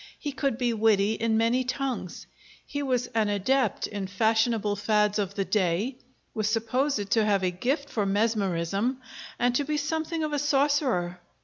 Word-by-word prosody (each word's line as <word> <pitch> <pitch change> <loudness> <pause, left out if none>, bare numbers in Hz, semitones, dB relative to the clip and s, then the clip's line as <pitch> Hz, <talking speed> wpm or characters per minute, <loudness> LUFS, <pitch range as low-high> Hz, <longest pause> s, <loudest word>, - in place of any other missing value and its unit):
He 290 - -4
could 275 -3 -1
be 245 -2 0
witty 215 -1 +3
in 225 0 0
many 230 +3 +2
tongues; 255 -7 -4 0.4
he 285 - -4
was 255 -3 0
an 220 -2 +2
adept 220 +4 +1
in 200 -2 -4
fashionable 220 +1 +1
fads 210 0 +1
of 200 -1 -2
the 195 -2 -1
day; 205 +6 0 0.4
was 215 -2 0
supposed 225 -1 0
to 225 - +4
have 200 -2 +2
a 180 - +1
gift 270 - -1
for 210 -7 -1
mesmerism, 205 +2 0 0.4
and 245 0 +2
to 285 - +1
be 300 +1 -1
something 320 +2 -2
of 305 -1 -2
a 290 - +1
sorcerer. 270 - +1
225 Hz, 170 wpm, -27 LUFS, 205-270 Hz, 0.4 s, to